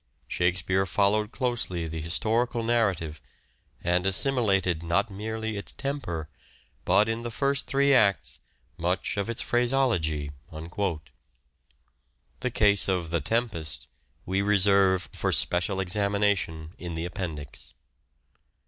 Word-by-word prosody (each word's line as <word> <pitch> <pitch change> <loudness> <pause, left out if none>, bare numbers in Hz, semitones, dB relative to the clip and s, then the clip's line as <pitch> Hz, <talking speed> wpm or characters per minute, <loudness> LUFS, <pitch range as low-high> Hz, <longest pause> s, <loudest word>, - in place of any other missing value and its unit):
Shakespeare 90 +2 0
followed 105 +4 +1
closely 120 -10 -2
the 80 0 -5
historical 115 +8 0
narrative, 95 -11 0 0.6
and 90 +2 +2
assimilated 95 - +2
not 90 +6 0
merely 110 +2 -4
its 100 - -6
temper, 130 - -4 0.6
but 105 - +4
in 115 +1 -2
the 120 - -4
first 140 +4 0
three 140 0 +3
acts, 100 -7 +2 0.4
much 90 +3 -1
of 100 +2 -2
its 115 - -1
phraseology." 120 - +1 2.1
The 125 - -2
case 105 -3 +4
of 90 -4 -1
"The 85 -2 0
Tempest" 95 - -2 0.4
we 95 +2 0
reserve 100 -2 +4
for - - -1
special 90 +3 +1
examination 95 -4 0
in 85 -2 -6
the 80 +1 -3
appendix. 80 -7 -6
100 Hz, 110 wpm, -27 LUFS, 85-115 Hz, 2.1 s, but